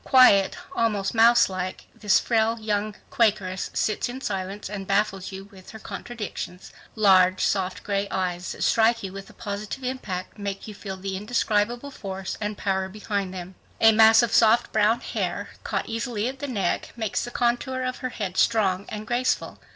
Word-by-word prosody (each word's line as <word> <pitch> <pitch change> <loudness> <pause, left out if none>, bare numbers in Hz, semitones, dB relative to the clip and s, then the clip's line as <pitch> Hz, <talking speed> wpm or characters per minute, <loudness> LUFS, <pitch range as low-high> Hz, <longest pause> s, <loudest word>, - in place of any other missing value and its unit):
Quiet, 205 -7 +6 0.2
almost 210 -4 0
mouselike, 225 -5 +3
this 210 -2 +3
frail 225 0 +1
young 210 -1 -1 0.2
Quakeress 200 -5 +1
sits 215 +2 0
in 250 +2 -6
silence 195 -4 -4
and 195 -1 -6
baffles 195 -1 0
you 190 0 -7
with 190 -2 -14
her 220 - -9
contradictions. 210 -5 -7 0.2
Large, 190 -3 +5
soft, 185 -2 -1
gray 200 0 -1
eyes 180 -1 -2
that - - -5
strike 230 0 +3
you 190 -1 -5
with 195 0 -9
a - - -15
positive 210 +5 -6
impact 215 -7 -5
make 200 0 -5
you 215 - -7
feel 195 -2 -7
the 190 0 -4
indescribable 230 +4 0
force 195 -6 -5
and 210 0 -3
power 190 -1 -1
behind 200 -1 -3
them. 185 0 -7 0.3
A 225 - +7
mass 220 +1 +7
of 230 - -1
soft 230 +1 +4
brown 215 +2 +3
hair, - - -3
caught - - -2
easily 225 -1 -2
at 265 +1 -5
the 285 - -4
neck, 200 -9 -2
makes 220 -4 -2
the 240 - -5
contour 245 +2 0
of 255 0 -2
her 255 - -4
head 195 -6 -5
strong 200 -4 +2
and 215 0 -6
graceful. 245 +3 -1
210 Hz, 175 wpm, -25 LUFS, 195-230 Hz, 0.3 s, A